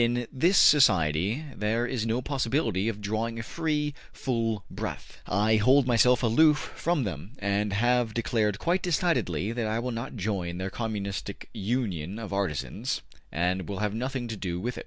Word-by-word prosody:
In 120 +1 +1
this 170 +8 +3
society 95 - +4
there 110 +3 0
is 120 -3 -2
no 120 +3 0
possibility 125 - 0
of 105 -2 -5
drawing 110 +3 -2
a 115 - -4
free, 150 +1 -1 0.2
full 115 -6 -2
breath. - - -6
I 105 +3 +3
hold 130 +5 +5
myself 125 +1 +4
aloof 150 +7 +5 0.2
from 170 -4 0
them, 90 - -5
and 100 +1 0
have 120 +2 +1
declared 110 -3 +1
quite 175 - +1
decidedly 155 - 0
that 115 -1 -2
I 110 +1 0
will 125 +2 -2
not 115 +1 -5
join 95 -5 -2
their 95 +1 -3
communistic 100 -3 -4
union 100 -5 -2
of 105 -4 -6
artisans, 75 -10 -2 0.3
and 90 +2 -1
will 100 - -3
have 105 0 -1
nothing 125 +2 -3
to 115 - -3
do 90 -4 -3
with 120 +6 -3
it.'' - - -3
110 Hz, 170 wpm, -27 LUFS, 100-125 Hz, 0.3 s, hold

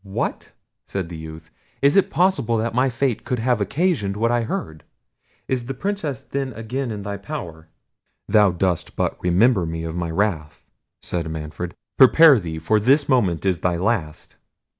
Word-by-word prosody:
"What!" 95 -1 -4 0.4
said 95 -4 -4
the 85 - -7
youth; 80 0 -10 0.3
"is 140 +1 +5
it 195 - +4
possible 140 - +1
that 115 +1 -1
my 125 +2 +2
fate 125 -1 -1
could 125 - -2
have 120 -1 0
occasioned 105 - 0
what 115 +2 +1
I 120 0 +2
heard! 80 -8 -5 0.6
Is 125 -2 -2
the 135 - -4
Princess 170 - -3
then 135 -2 -4
again 120 +4 -4
in 105 -2 -5
thy 100 0 -4
power?" 85 - -7 0.6
"Thou 105 -2 +5
dost 90 -1 -1
but - - -2
remember 95 +4 +3
me 80 0 -4
of 80 0 -5
my 85 -1 -2
wrath," 80 -4 -2 0.4
said 85 -2 -3
Manfred. 80 +2 -6 0.2
"Prepare 140 +1 +8
thee, 80 -4 -5
for 105 +7 +1
this 135 +7 +3
moment 100 - +1
is 90 -4 +1
thy 90 +1 0
last." 90 -5 -2
105 Hz, 170 wpm, -22 LUFS, 85-130 Hz, 0.6 s, Prepare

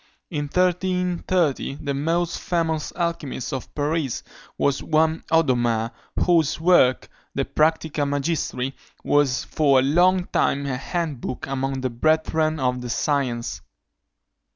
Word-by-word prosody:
In 145 -3 -2
1330 180 -3 0
the 140 -1 -3
most 165 +4 -1
famous 165 -3 -1
alchymist 165 -8 -3
of 130 - -5
Paris 145 -3 -1 0.3
was 140 -1 +1
one 160 +1 +1
Odomare, 120 -8 +2 0.3
whose 165 -5 +3
work, 160 -7 +4 0.3
De - - 0
Practica 155 -1 +1
Magistri, 140 -2 -1 0.3
was 145 -3 +2
for 140 -3 +2
a 130 - +4
long 175 +6 +3
time 140 +1 +1
a 135 -2 -1
hand 150 -1 -3
book 125 - -4
among 135 0 -2
the 130 -1 -1
brethren 155 +4 +1
of 125 -1 0
the 125 - -6
science. 125 -2 -1
150 Hz, 125 wpm, -23 LUFS, 135-165 Hz, 0.3 s, work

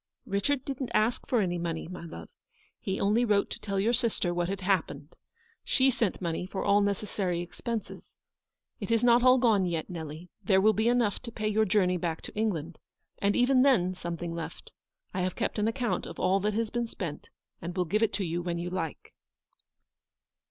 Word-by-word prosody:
" - - -63
Richard 250 +6 0
didn't 270 -2 -3
ask 220 +3 +1
for 240 -4 +2
any 175 -2 -1
money,, 165 -2 -3
my 180 0 -8
love. 85 - -9 0.5
He 190 0 -3
only 210 +4 +3
wrote 205 -4 +2
to - - -5
tell 200 -2 -2
your 225 +5 +2
sister 230 -7 0
what 175 0 -1
had 195 0 -3
hap 190 -2 +2
pened. 145 +2 -10 0.5
She 265 0 +3
sent 230 -6 0
money 170 +1 -2
for 190 - -4
all 200 0 +5
necessary 200 -3 -1
ex 175 - -13
penses. 230 -3 -5 0.6
It - - -5
is 230 0 +2
not 240 0 +6
all 255 +1 +6
gone 220 -7 +3
yet, 165 0 -3
Nelly; 160 0 -7
there 190 -3 +4
will 215 +3 +5
be 220 +2 +1
enough 235 -4 +2
to 235 - -7
pay 215 -1 -3
your 215 +1 +3
journey 185 -2 +2
back 165 -2 -3
to - - -8
England; 175 -7 -2 0.4
and 200 0 +2
even 255 +1 +4
then 200 -10 +4
something 170 -1 -5
left. 170 -1 -7 0.4
I 185 - -1
have 185 0 -1
kept - - -2
an 210 - +2
account 240 +1 -1
of - - -9
all 190 +2 +3
that 210 +1 -1
has 225 -1 -1
been 240 0 -1
spent, 170 -9 -6 0.3
and 175 +2 -5
will 180 - +2
give 210 +7 0
it 225 - +2
to 195 -1 -1
you 170 +1 -2
when 170 -1 -2
you 175 +1 -4
like." 170 -5 -4
200 Hz, 210 wpm, -29 LUFS, 175-225 Hz, 0.6 s, not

